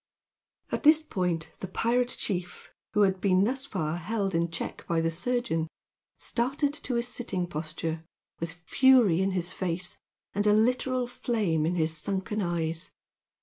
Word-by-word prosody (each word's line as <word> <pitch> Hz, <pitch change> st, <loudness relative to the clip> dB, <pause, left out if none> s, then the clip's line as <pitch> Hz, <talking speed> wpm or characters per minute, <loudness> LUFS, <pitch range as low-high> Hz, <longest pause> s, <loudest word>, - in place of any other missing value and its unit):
At -, -, -1 dB
this 310 Hz, +1 st, +6 dB
point 180 Hz, -, -1 dB
the 190 Hz, -, -4 dB
pirate 240 Hz, +6 st, +1 dB
chief, 180 Hz, -3 st, -3 dB, 0.2 s
who 210 Hz, -, +5 dB
had 190 Hz, -2 st, +3 dB
been 190 Hz, -1 st, +4 dB
thus 265 Hz, +5 st, -1 dB
far 165 Hz, -, -2 dB
held 195 Hz, +2 st, -1 dB
in 170 Hz, 0 st, +1 dB
check 165 Hz, -, -5 dB
by 170 Hz, -1 st, +1 dB
the 165 Hz, 0 st, +1 dB
surgeon, 180 Hz, -3 st, 0 dB, 0.5 s
started 275 Hz, +4 st, 0 dB
to 255 Hz, -4 st, -2 dB
a 235 Hz, -, +1 dB
sitting 235 Hz, -7 st, -2 dB
posture, 160 Hz, 0 st, -4 dB, 0.4 s
with 165 Hz, 0 st, -3 dB
fury 200 Hz, +1 st, +4 dB
in 190 Hz, -, +2 dB
his 180 Hz, -1 st, -1 dB
face 180 Hz, -1 st, -3 dB, 0.3 s
and 205 Hz, +1 st, +1 dB
a 210 Hz, -, +6 dB
literal 250 Hz, +3 st, +2 dB
flame 210 Hz, -10 st, 0 dB
in 175 Hz, -, 0 dB
his 160 Hz, -2 st, +1 dB
sunken 195 Hz, +5 st, -2 dB
eyes. 165 Hz, -2 st, -2 dB
190 Hz, 155 wpm, -28 LUFS, 165-240 Hz, 0.5 s, this